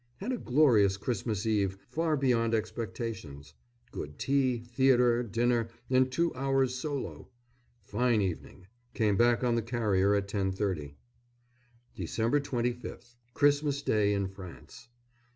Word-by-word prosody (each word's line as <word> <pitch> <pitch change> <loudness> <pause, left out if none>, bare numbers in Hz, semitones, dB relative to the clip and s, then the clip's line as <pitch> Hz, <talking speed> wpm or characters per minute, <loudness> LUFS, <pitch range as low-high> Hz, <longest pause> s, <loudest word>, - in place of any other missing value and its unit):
Had 255 - -4
a 255 - -1
glorious 120 -8 +4
Christmas 110 -1 -2
Eve, 100 -3 +1
far 155 +4 0
beyond 115 -4 +2
expectations. 110 - -5 0.4
Good 75 0 -7
tea, 135 -3 +1
theatre, 120 0 +3
dinner, 120 +1 0 0.2
and 130 0 +3
two 170 +5 0
hours' 135 -1 +1
solo. 140 +1 -5 0.6
Fine 115 +3 +1
evening. 95 -1 -4 0.3
Came 105 -4 +2
back 120 +3 +3
on 120 -1 +2
the 115 - +1
carrier 105 -4 +1
at 100 -1 -1
10.30. 95 -7 -2 1.0
Dec. 120 +6 0
25th. 125 -1 -4 0.2
Christmas 145 -1 +2
Day 105 -1 +2
in 100 -1 0
France. 95 +6 -12
115 Hz, 120 wpm, -30 LUFS, 100-130 Hz, 1.0 s, glorious